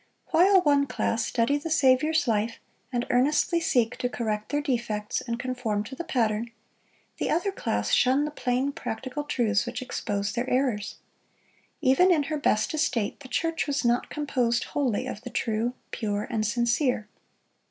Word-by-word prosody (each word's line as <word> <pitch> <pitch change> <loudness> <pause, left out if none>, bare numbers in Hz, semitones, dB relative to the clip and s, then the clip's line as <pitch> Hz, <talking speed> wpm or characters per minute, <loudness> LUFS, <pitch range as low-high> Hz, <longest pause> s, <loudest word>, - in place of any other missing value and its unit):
While 375 +2 +6
one 285 -3 +3
class 230 -2 -1
study 235 +5 +1
the 300 +3 -5
Saviour's 305 +2 +3
life, 225 0 0 0.3
and 240 -1 -1
earnestly 295 +7 +3
seek 250 -8 +1
to 245 - -1
correct 215 -3 -3
their 290 - 0
defects 235 -7 -2
and 235 0 -4
conform 250 -5 -2
to 260 +5 -8
the 340 - -5
Pattern, 235 -8 0 0.7
the - - -1
other 345 +5 +1
class 105 - -2
shun 265 +3 +4
the 300 - -4
plain, 260 -1 0
practical 265 -1 -5
truths 230 -7 +1
which 245 0 -4
expose 205 -5 -3
their 245 +2 -2
errors. 250 -6 0 0.9
Even 305 +7 +5
in 310 -4 +3
her 305 +2 -2
best 215 -4 +1
estate, 250 -9 0
the 275 - -11
church 330 +5 -1
was 285 -2 -1
not 240 +1 +2
composed 250 -5 0
wholly 255 -8 -1
of 205 - -6
the 245 - -7
true, 230 +1 -1 0.2
pure, 205 -2 -2
and 220 -2 0
sincere. 235 0 +1
250 Hz, 165 wpm, -27 LUFS, 225-290 Hz, 0.9 s, While